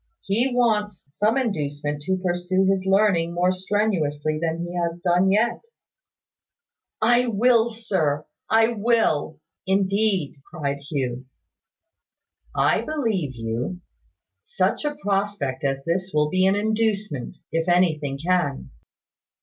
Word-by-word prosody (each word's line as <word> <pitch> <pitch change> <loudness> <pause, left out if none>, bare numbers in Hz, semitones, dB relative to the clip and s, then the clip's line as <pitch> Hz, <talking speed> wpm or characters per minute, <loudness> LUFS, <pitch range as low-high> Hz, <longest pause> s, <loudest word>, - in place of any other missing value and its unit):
He 235 +7 +1
wants 220 -4 0
some 210 - +1
inducement 145 - -2
to 190 0 +1
pursue 180 +1 0
his 190 0 +1
learning 190 -4 +2
more 180 +1 +3
strenuously 185 -6 -1
than 165 +1 -1
he 175 - -7
has 170 -1 -2
done 180 +1 +2
yet 225 +4 +1 0.7
" 475 - -63 0.2
"I 250 - 0
will, 235 +1 +3
sir. 160 -10 -1 0.2
I 225 +1 +4
will," 215 -10 +1 0.3
indeed, 195 -4 +1
cried 140 -4 -3
Hugh. 130 -3 -3 1.3
"I - - +3
believe 220 - -2
you 115 -1 -3
will. 175 +9 -3 0.6
Such 485 -9 -1
a 295 0 -1
prospect 200 - -2
as 135 -1 -1
this 185 +3 -1
will 150 0 +2
be 185 0 +3
an 195 - +3
inducement, 210 - -1
if 165 +2 0
anything 155 -6 +2
can. 165 -3 -1
185 Hz, 125 wpm, -23 LUFS, 155-210 Hz, 1.3 s, I